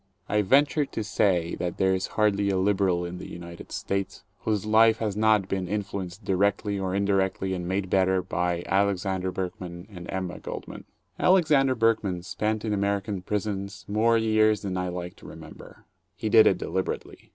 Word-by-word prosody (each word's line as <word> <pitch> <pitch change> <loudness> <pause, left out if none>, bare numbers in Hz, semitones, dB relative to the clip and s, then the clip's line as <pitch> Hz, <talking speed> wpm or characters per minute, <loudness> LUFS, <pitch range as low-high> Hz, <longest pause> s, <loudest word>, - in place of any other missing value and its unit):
I 105 0 +2
venture 140 +7 +3
to 115 -5 -4
say 90 -5 +1
that 90 -1 -3
there 95 0 +3
is 95 0 -1
hardly 100 -2 +2
a 95 - +1
liberal 95 -2 +1
in 90 +1 -6
the - - -8
United 85 0 -10
States 95 -1 -3 0.2
whose 105 -2 -1
life 110 +1 +5
has 105 -3 -2
not 105 -2 +3
been 95 -2 -2
influenced 100 -1 -4
directly 100 +1 +1
or 95 -1 -2
indirectly 95 -1 0
and 90 -1 -4
made 95 +1 -1
better, 95 0 +2
by 90 -1 -1
Alexander 95 -1 0
Berkman 90 -1 -6
and 90 -2 -9
Emma 95 -2 -4
Goldman. - - -8 0.3
Alexander 150 -8 +4
Berkman 110 -6 +1
spent 105 +5 -2
in 105 - 0
American 100 -1 -1
prisons 100 0 -4
more 115 +3 +3
years 110 -1 +3
than 95 -2 -3
I 90 0 -1
like 90 0 -6
to - - -13
remember. - - -12 0.3
He 110 - -3
did 110 0 +7
it - - +3
deliberately. - - -4
100 Hz, 170 wpm, -26 LUFS, 95-105 Hz, 0.3 s, did